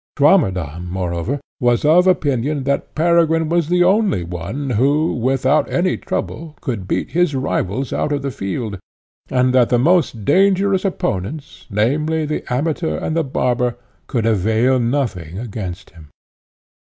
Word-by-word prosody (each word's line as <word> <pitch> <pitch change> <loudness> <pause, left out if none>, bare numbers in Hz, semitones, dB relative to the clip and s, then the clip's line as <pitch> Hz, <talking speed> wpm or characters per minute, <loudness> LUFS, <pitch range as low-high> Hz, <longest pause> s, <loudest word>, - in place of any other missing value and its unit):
Swammerdamm, 90 - +2
moreover, 90 +8 -2 0.2
was 120 0 +2
of 175 +5 +5
opinion 145 -4 +1
that 140 +1 -2
Peregrine 165 -1 +2
was 170 -2 +1
the 180 0 +3
only 195 - +2
one 90 - -5
who, 140 +8 +2
without 130 +4 +1
any 180 +1 +1
trouble, 155 -1 -5
could 115 - -4
beat - - -2
his 175 -3 +1
rivals 130 -2 -2
out - - -1
of 145 -1 -1
the 140 - -2
field; 100 -1 -4 0.5
and 125 0 +2
that 125 -2 +4
the 120 - +3
most 135 - +2
dangerous 195 +3 +3
opponents, 145 - -4
namely, 150 +10 0
the 150 0 -3
Amateur 130 - -1
and 155 - -3
the 165 - +2
Barber, 125 -3 0 0.3
could 115 -4 -1
avail 110 +4 +2
nothing 115 - -2
against 100 -5 -6
him. 80 -3 -16
130 Hz, 140 wpm, -19 LUFS, 110-155 Hz, 0.5 s, of